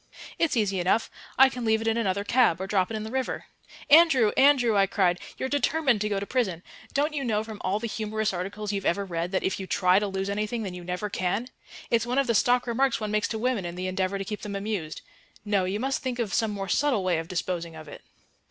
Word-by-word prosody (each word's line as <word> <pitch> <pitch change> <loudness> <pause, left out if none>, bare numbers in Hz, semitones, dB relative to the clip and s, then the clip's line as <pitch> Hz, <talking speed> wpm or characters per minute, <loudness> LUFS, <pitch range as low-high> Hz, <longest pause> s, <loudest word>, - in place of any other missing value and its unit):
"It's 325 -6 +1
easy 200 -4 +1
enough. 185 +6 +1 0.3
I 265 - +8
can 250 -2 -5
leave 220 -1 +2
it 225 - -4
in 225 - +2
another 200 -3 0
cab, 230 -6 +3
or 190 - -3
drop 190 -2 +1
it 220 - -3
in 215 - -5
the 220 - -6
river." 260 0 -2 0.4
"Andrew, 285 -8 +6
Andrew," 265 -5 +4
I 195 -1 +4
cried, 180 -3 +1 0.2
"you're 260 - -2
determined 285 -3 +1
to 210 - 0
go 200 -1 0
to 200 - -4
prison! 200 -8 -1 0.3
Don't 295 +2 +1
you 285 -2 -2
know 215 -4 0
from 220 -2 -9
all 190 +2 0
the 225 - -4
humorous 215 -1 -2
articles 200 +3 -4
you've 195 -1 -2
ever 200 +3 0
read 170 -1 -3
that, 190 - 0
if 190 - -1
you 190 - -6
try 185 0 +3
to 205 - -2
lose 195 0 -3
anything, 215 +3 -2
then 190 -3 -5
you 180 -1 -8
never 180 +4 -3
can? 200 +5 -2 0.4
It's 230 0 +2
one 250 +2 -1
of 275 - +3
the 235 - +1
stock 245 +3 +3
remarks 255 +1 +1
one 215 -1 -3
makes 210 0 +1
to 220 - -3
women 240 -3 0
in 175 0 -5
the 180 +1 -4
endeavour 185 +1 -1
to 195 - -4
keep 210 +1 -5
them 205 -1 -5
amused. 195 -6 -4 0.4
No, 200 -3 +1
you 195 +3 -2
must 270 +3 -1
think 255 -2 -3
of 230 -5 -2
some 225 -2 +1
more 200 -2 -4
subtle 250 0 +1
way 180 -3 +1
of 165 - -6
disposing 170 -2 -3
of 155 -1 -10
it." 145 - -10
210 Hz, 255 wpm, -26 LUFS, 190-240 Hz, 0.4 s, I